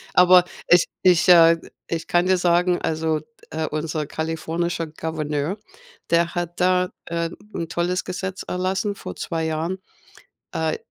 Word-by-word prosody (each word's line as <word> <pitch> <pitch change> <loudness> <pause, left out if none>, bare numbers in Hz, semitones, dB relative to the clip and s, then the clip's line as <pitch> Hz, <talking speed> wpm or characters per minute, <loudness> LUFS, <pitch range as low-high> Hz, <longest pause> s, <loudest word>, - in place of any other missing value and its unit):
Aber 180 0 +7 0.2
es 175 0 +6 0.2
ich, 180 -1 +4
äh, 165 -1 +8 0.3
ich 165 -1 -3
kann 175 +1 +2
dir 185 0 +4
sagen, 175 0 +2
also 160 -1 -1
d - - -20 0.3
äh, 160 0 -2
unser 155 0 -2
kalifornischer 165 +2 -2
Gouverneur, 155 +2 -3 0.5
der 170 +1 +2
hat 175 0 -4
da 180 0 +3 0.2
äh, 170 0 -2 0.2
'n 165 - -3
tolles 175 +2 -1
Gesetz 190 0 -4
erlassen 190 +3 -1
vor - - -8
2 165 -1 -3
Jahren. 160 +4 -2 0.8
Äh, 160 -1 -1
170 Hz, 145 wpm, -23 LUFS, 160-180 Hz, 0.8 s, äh